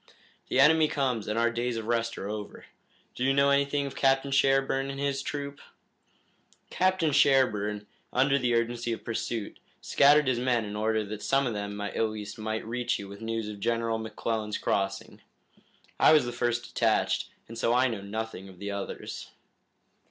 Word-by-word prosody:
The - - 0
enemy 155 +3 +6
comes 130 -7 -1
and 105 +1 -2
our 115 0 +3
days 120 0 -2
of 110 - -4
rest 115 0 -1
are 100 - -5
over. 105 0 -6 0.5
Do 125 - -4
you 135 +1 +3
know 140 0 +4
anything 140 0 +2
of 140 - -6
Captain 135 0 +2
Sherburne 135 0 +2
and 135 0 -5
his 140 -1 -1
troop?" 140 0 -5 1.1
"Captain 185 -4 +2
Sherburne, 110 -7 +3 0.3
under 135 +2 +3
the 125 -2 +1
urgency 115 0 -1
of - - -7
pursuit, 115 -1 -4 0.2
scattered 145 +1 +5
his 125 -2 +1
men 120 -3 +1
in 105 0 -6
order 110 +1 0
that 105 +1 -7
some 135 +4 +2
of 120 - -1
them 100 0 -4
at 105 0 -4
least 105 0 -7
might 110 0 -3
reach 120 +2 -1
you 100 - -8
with 100 +1 -10
the 110 - -8
news 115 -1 -2
of 105 -1 -7
General 115 +1 0
McClellan's 110 -1 -3
crossing. 95 0 -2 0.8
I - - +7
was 150 -5 +5
the 120 - -3
first 120 0 -1
detached, 115 -2 +1 0.2
and 115 - -9
so 115 0 0
I 130 +1 +4
know 115 -5 -4
nothing 100 -1 -5
of 95 - -14
the 100 +2 -5
others." 100 0 -6
115 Hz, 180 wpm, -28 LUFS, 110-135 Hz, 1.1 s, I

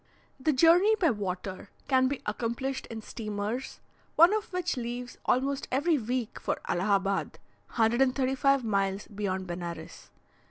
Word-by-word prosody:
The 305 +4 +2
journey 340 +9 +5
by 345 -8 +3
water 190 -2 -4 0.2
can 260 -1 +4
be 280 0 -3
accomplished 235 +5 -3
in 225 -1 -7
steamers, 215 +4 -4 0.3
one 340 +5 +7
of 430 -1 -2
which 360 -2 -1
leaves 245 0 -5
almost 275 +2 +1
every 290 +4 +2
week 245 0 -3
for - - -1
Allahabad 195 +1 0 0.3
(135 265 +3 +2
miles 195 -2 0
beyond 195 -2 -3
Benares). 175 -1 -7
245 Hz, 125 wpm, -29 LUFS, 205-275 Hz, 0.3 s, one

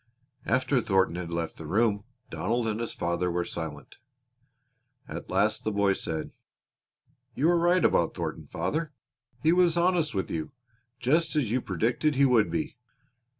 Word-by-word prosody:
After 130 +1 +2
Thornton 95 -5 +2
had 85 -2 -5
left 85 -1 -3
the 80 - -8
room 105 +2 +1 0.3
Donald 115 +4 -1
and 110 0 -1
his 115 - -3
father 85 +1 -1
were 85 0 -1
silent. 80 -4 -7 1.1
At - - -7
last - - +1
the 110 - -1
boy 100 -1 +2
said: 80 -4 -4 1.0
"You 155 +5 +2
were 175 -1 +4
right 175 +2 +3
about - - +2
Thornton, - - -4
father. 155 -1 -2 0.5
He 160 +2 +5
was 175 -2 +4
honest 170 - +2
with 95 - -2
you, 80 +8 -4 0.5
just 155 +7 +1
as 130 -8 +1
you 125 +1 +1
predicted 120 - 0
he 140 +1 +5
would 120 -5 +4
be." 155 -4 -3
115 Hz, 155 wpm, -28 LUFS, -, 1.1 s, He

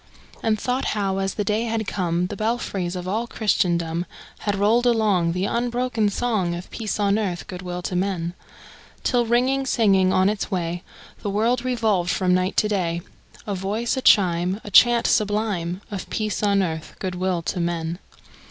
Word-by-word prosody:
And 220 -2 +1
thought 250 +4 -1
how, 195 -1 0
as 195 0 -1
the 210 - -1
day 215 +3 0
had 225 -1 -1
come, 175 -3 -1
The 205 - -5
belfries 200 -5 -2
of 180 0 -5
all 220 +5 -1
Christendom 175 -6 0 0.3
Had 205 -1 -1
rolled 220 +5 +3
along 205 -8 +2
The 180 +2 -1
unbroken 240 -1 0
song 200 -6 0
Of 175 +1 -8
peace 215 -2 -3
on 205 +1 +2
earth, 185 -5 -2
good 180 -1 -7
will 180 -1 -5
to 180 - -3
men! 180 -2 -1 0.7
Till, 240 -2 +2
ringing, 255 +3 +2
singing 195 -6 +3
on 185 0 +3
its 210 0 -1
way, 175 -3 -2 0.4
The 205 - -2
world 230 +5 +1
revolved 220 -8 +1
from 180 0 +2
night 185 +1 0
to 215 - +4
day, 175 -5 -1 0.4
A 205 - -2
voice, 205 +6 -1
a 260 - -2
chime, 185 -3 +4
A 205 - -8
chant 240 +3 +6
sublime 205 -4 0
Of 200 -3 -5
peace 215 -3 -2
on 200 -2 +3
earth, 160 -3 -4
good 185 -1 -3
will 180 -1 -1
to 180 - -2
men! 170 0 -2
200 Hz, 180 wpm, -23 LUFS, 180-220 Hz, 0.7 s, chant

